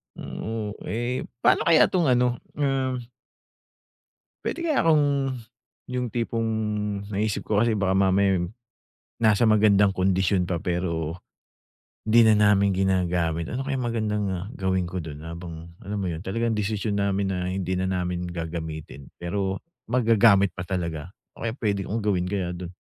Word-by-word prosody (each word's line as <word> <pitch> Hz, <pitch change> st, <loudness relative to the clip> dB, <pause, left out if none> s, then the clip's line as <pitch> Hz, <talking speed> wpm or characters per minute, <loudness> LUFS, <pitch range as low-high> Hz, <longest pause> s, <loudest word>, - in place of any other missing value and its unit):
Hmm, 110 Hz, -2 st, -5 dB, 0.2 s
eh 120 Hz, +3 st, -2 dB, 0.2 s
pano -, -, +4 dB
kaya 165 Hz, -2 st, +6 dB
tong 180 Hz, -2 st, +1 dB
ano, 125 Hz, 0 st, +3 dB, 0.2 s
um. 135 Hz, -3 st, 0 dB, 1.4 s
Puwede 340 Hz, -, -2 dB
kaya 310 Hz, -4 st, +2 dB
akong, 145 Hz, -4 st, +2 dB, 0.5 s
yung 125 Hz, -1 st, -3 dB
tipong 115 Hz, 0 st, -1 dB, 0.6 s
naisip 105 Hz, +1 st, -1 dB
ko 105 Hz, -1 st, +2 dB
kasi 115 Hz, -2 st, +2 dB
baka 95 Hz, -2 st, +1 dB
mamaya, 95 Hz, -1 st, +3 dB
eh, 85 Hz, -, -3 dB, 0.7 s
nasa 110 Hz, -1 st, +4 dB
magandang 105 Hz, -2 st, +5 dB
kondisyon 95 Hz, 0 st, +1 dB
pa 85 Hz, -2 st, -2 dB
pero 85 Hz, -2 st, -2 dB, 0.9 s
hindi 115 Hz, +1 st, +7 dB
na 110 Hz, -1 st, +6 dB
namin 100 Hz, -1 st, +4 dB
ginagamit. 90 Hz, -3 st, 0 dB
Ano 125 Hz, -, -2 dB
kayang 135 Hz, -2 st, -2 dB
magandang, 110 Hz, -3 st, -1 dB
ah, 90 Hz, +1 st, -4 dB
gawin 95 Hz, -2 st, 0 dB
ko 90 Hz, -, -6 dB
do'n 75 Hz, -2 st, -8 dB
habang 85 Hz, 0 st, -8 dB
alam 100 Hz, +1 st, -3 dB
mo 95 Hz, -, -1 dB
'yon 85 Hz, +1 st, -5 dB
talagang 115 Hz, +3 st, -1 dB
desisyon 105 Hz, 0 st, -1 dB
namin 100 Hz, 0 st, +1 dB
na 90 Hz, -1 st, -2 dB
hindi 95 Hz, -1 st, -2 dB
na 90 Hz, -, 0 dB
namin 90 Hz, -1 st, -2 dB
gagamitin 80 Hz, -4 st, -6 dB
pero 95 Hz, +2 st, -2 dB, 0.3 s
magagamit 115 Hz, -5 st, +4 dB
pa 90 Hz, -, -4 dB
talaga, 85 Hz, -2 st, -4 dB, 0.2 s
ano -, -, -16 dB
kaya 115 Hz, -1 st, -1 dB
puwede 100 Hz, -6 st, -1 dB
kong 110 Hz, +4 st, -2 dB
gawin 100 Hz, -4 st, +1 dB
kaya 95 Hz, -2 st, -2 dB
do'n? 90 Hz, 0 st, -7 dB
100 Hz, 150 wpm, -25 LUFS, 90-115 Hz, 1.4 s, hindi